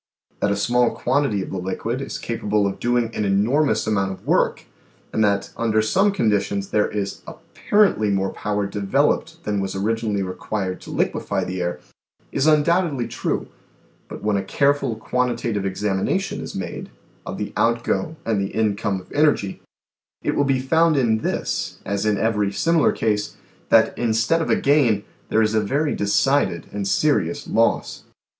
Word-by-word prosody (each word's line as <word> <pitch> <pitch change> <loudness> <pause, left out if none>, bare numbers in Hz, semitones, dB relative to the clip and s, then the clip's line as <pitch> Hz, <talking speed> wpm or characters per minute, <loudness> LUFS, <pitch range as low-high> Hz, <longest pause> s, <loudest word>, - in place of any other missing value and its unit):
That - - +1
a - - +1
small 120 +4 +2
quantity 125 -6 0
of - - -8
the 95 - -3
liquid 110 +7 -3
is 135 - -5
capable 105 -3 -1
of 100 0 -2
doing 120 -1 +1
an - - -1
enormous 110 +5 +2
amount 100 -3 0
of 95 - -10
work, - - +1 0.5
and 110 - +2
that 100 -1 +1
under 110 -2 +1
some 195 - +3
conditions 100 - 0
there 105 -1 +2
is 100 -2 -4
apparently 200 - +1
more 95 -1 0
power 105 -1 -2
developed 100 -1 0
than 105 -1 -1
was 95 -1 -3
origin 110 +2 -1
ally 100 - 0
required 95 0 -3
to - - -11
liquefy - - -1
the 90 0 -4
air, 85 0 -2 0.5
is 140 +2 +1
undoubtedly 155 -3 +2
true, - - -2 0.6
but - - -9
when 105 -1 +1
a 100 - -1
careful 140 +1 +1
quantitative 115 -3 -1
examination 95 0 -1
is - - -7
made - - -5 0.3
of - - -6
the - - -4
outgo 115 +7 0
and 110 -3 +1
the 100 - -4
income 105 -2 0
of - - -20
energy, 145 -10 +1 0.6
it - - 0
will 145 - +2
be 135 -1 +2
found 160 +4 +3
in 115 -4 +2
this, - - -2
as 100 +1 -1
in 105 -1 +2
every 105 -2 +1
similar 165 +8 +2
case, 105 -2 -1 0.3
that 110 -1 +4
instead 115 +7 +2
of - - -2
a - - +4
gain 130 -8 +3 0.3
there 110 - +3
is 105 0 +1
a 110 - +3
very 140 +8 0
decided 105 -1 +1
and 100 -1 -3
serious 145 +5 +1
loss. 115 0 0
110 Hz, 165 wpm, -22 LUFS, 100-130 Hz, 0.6 s, that